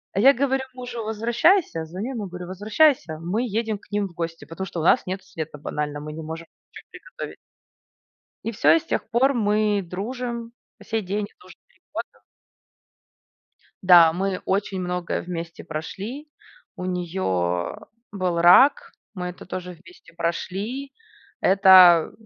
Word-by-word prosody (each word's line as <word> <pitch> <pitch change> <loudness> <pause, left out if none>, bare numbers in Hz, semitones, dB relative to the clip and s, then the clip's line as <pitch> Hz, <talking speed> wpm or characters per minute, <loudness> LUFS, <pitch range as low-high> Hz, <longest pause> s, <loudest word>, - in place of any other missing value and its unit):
Я 260 +8 +6
говорю 270 0 0
мужу: 245 -2 -6
"Возвращайся". 230 - +2
Звоню 190 +10 -5
ему, 215 -5 -4
говорю: 180 0 -8
"Возвращайся, 205 - +2
мы 185 +9 -1
едем 225 -1 -2
к 200 - -24
ним 205 -1 0
в 175 - -16
гости, 165 -1 -5
потому 190 +4 -6
что 175 -2 -6
у - - -2
нас 175 - +4
нет 190 +1 -4
света 160 -4 -7
банально, 150 0 -4
мы 150 +1 -7
не 160 - -7
можем 160 +1 -7 0.2
ничего - - -13
приготовить". - - -9 1.1
И 230 - -2
всё, 155 -6 +4
и 165 - +3
с - - -16
тех - - -2
пор 260 +4 +3
мы 210 -3 +1
дружим 235 +6 -5 0.3
по - - -16
сей 225 -1 -1
день. 205 +2 -2
Это - - -21
уже - - -14
3 - - -32
года. - - -6 1.6
Да, 175 -3 +8
мы 190 +1 -2
очень 195 0 -1
многое 180 -1 -2
вместе 170 -1 -6
прошли. 200 - -6 0.5
У 180 - -6
нее, 180 0 -3
а, 90 -1 -1 0.2
был 185 -4 -1
рак, 285 - +6 0.2
мы 180 -3 -4
это 180 - -9
тоже 180 0 -6
вместе 175 0 -18
прошли. 195 +10 -3 0.5
Это 185 -3 +7
190 Hz, 155 wpm, -23 LUFS, 170-225 Hz, 1.6 s, Да